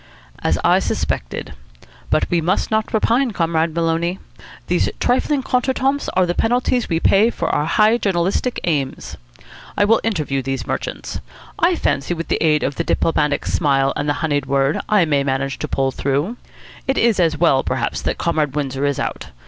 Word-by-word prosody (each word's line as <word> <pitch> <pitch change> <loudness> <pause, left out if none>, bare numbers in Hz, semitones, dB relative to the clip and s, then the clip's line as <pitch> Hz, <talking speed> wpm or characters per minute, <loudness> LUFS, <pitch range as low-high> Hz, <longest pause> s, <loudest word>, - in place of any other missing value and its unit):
"As - - +1
I - - +4
suspected. - - -3 0.6
But - - +2
we 170 -1 +2
must 180 +7 0
not 220 0 0
repine, 235 +3 +1
Comrade 165 -2 0
Maloney. 170 +2 0 0.5
These - - +1
trifling 265 +3 +1
contretemps 265 +2 0
are 185 0 +4
the 175 - -1
penalties 245 +3 +1
we 165 - +1
pay 200 +6 +4
for 170 -8 -3
our 150 - +1
high 215 +7 +3
journalistic 195 +5 0
aims. 145 -6 -2 0.6
I 205 - +4
will 225 +2 +3
interview 155 -11 -1
these 135 +1 -3
merchants. - - -4 0.4
I 345 +1 +3
fancy 175 - -1
that - - -11
with 165 - -5
the - - 0
aid 150 -2 +3
of 135 +1 -2
the - - 0
Diplomatic 150 -3 0
Smile 135 -4 +1
and 145 0 -2
the - - +3
Honeyed 145 -3 -1
Word 140 +2 +1
I 205 -5 +4
may 145 -3 +1
manage 135 0 -2
to - - -3
pull 135 0 0
through. 140 - -1 0.5
It 270 - +1
is 230 -4 +3
as 165 -3 +2
well, 145 -5 +3
perhaps, - - -2
that - - -2
Comrade 155 -4 0
Windsor 140 -1 -2
is 140 - -1
out. - - -4
165 Hz, 180 wpm, -19 LUFS, 145-215 Hz, 0.6 s, I